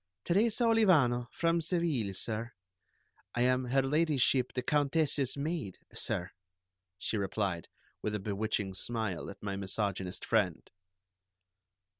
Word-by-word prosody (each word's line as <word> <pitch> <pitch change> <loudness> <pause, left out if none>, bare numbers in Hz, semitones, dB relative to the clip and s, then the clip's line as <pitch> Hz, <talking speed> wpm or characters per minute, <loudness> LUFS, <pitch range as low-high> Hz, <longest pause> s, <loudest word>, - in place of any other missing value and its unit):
"Teresa 220 +6 +2
Olivano, 165 - +4
from 170 0 +1
Seville, 155 - 0
sir. 115 +4 -1 0.8
I 120 - +1
am 130 +1 +3
Her 135 +2 +2
Ladyship 135 -3 +2
the 125 - -2
Countess's 145 -1 +2
maid, 145 - -3 0.2
sir," 90 +2 -2 0.7
she 105 +4 -2
replied, 95 -3 -2 0.3
with 105 0 -2
a - - -1
bewitching 100 0 -2
smile 110 -2 -2
at 100 - -11
my 100 -1 -2
misogynist 95 -1 -2
friend. - - +1
120 Hz, 115 wpm, -32 LUFS, 100-155 Hz, 0.8 s, Olivano